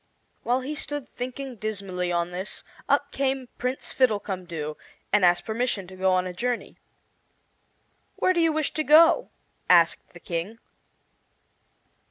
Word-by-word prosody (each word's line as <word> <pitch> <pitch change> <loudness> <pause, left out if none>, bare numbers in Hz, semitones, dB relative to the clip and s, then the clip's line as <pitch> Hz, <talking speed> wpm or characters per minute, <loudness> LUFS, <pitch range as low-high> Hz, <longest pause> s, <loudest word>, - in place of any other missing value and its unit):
While 250 +2 +1
he 275 +4 -4
stood 290 -2 -5
thinking 255 0 -6
dismally 195 -4 -3
on 170 0 0
this, 185 +3 -5 0.3
up 285 0 +2
came 265 -2 -1
Prince 250 +2 -3
Fiddlecumdoo 185 - -1 0.4
and 210 -2 +4
asked 175 0 +4
permission 225 -3 -1
to 185 +1 -12
go 190 0 +2
on 185 0 +2
a 180 - -5
journey. 245 +5 -3 1.4
"Where 370 - +2
do 345 - +2
you 330 -1 +4
wish 310 -1 -1
to 310 - 0
go?" 315 +3 +6 0.4
asked 170 -2 +4
the 175 - -12
King. 170 +6 -4
220 Hz, 140 wpm, -26 LUFS, 180-265 Hz, 1.4 s, go